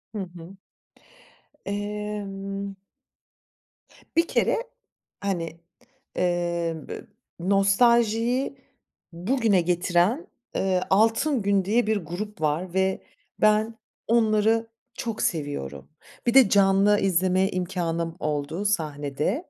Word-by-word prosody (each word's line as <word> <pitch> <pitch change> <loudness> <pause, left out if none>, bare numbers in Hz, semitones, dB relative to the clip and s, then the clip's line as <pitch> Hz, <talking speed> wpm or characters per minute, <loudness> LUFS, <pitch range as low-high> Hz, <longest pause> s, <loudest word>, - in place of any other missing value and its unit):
Hı - - -2 0.2
hı. 170 +3 -11 1.1
Emm 200 -1 -4 1.4
bir 335 0 +4
kere, - - +2 0.6
hani, 170 -4 -3 0.6
emm, 170 -2 -1
ı - - -7 0.3
nostaljiyi 230 +7 +2 0.6
bugüne 205 +2 +2
getiren, 180 - +1 0.3
ııı, 185 -1 +1
Altın 225 +6 +3
Gün 200 -1 +2
diye 225 +3 +2
bir 220 0 +2
grup 195 +2 -6
var 160 +4 -1
ve 190 0 +1 0.4
ben 215 +1 +3 0.3
onları 225 0 +3 0.3
çok 230 -2 -4
seviyorum. 110 - -3 0.4
Bir 240 - +3
de 260 -6 +7
canlı 200 +1 +4
izleme 185 0 +2
imkânım 170 -2 -2
oldu 150 +5 -2
sahnede. 155 - -1
195 Hz, 90 wpm, -25 LUFS, 175-215 Hz, 1.4 s, de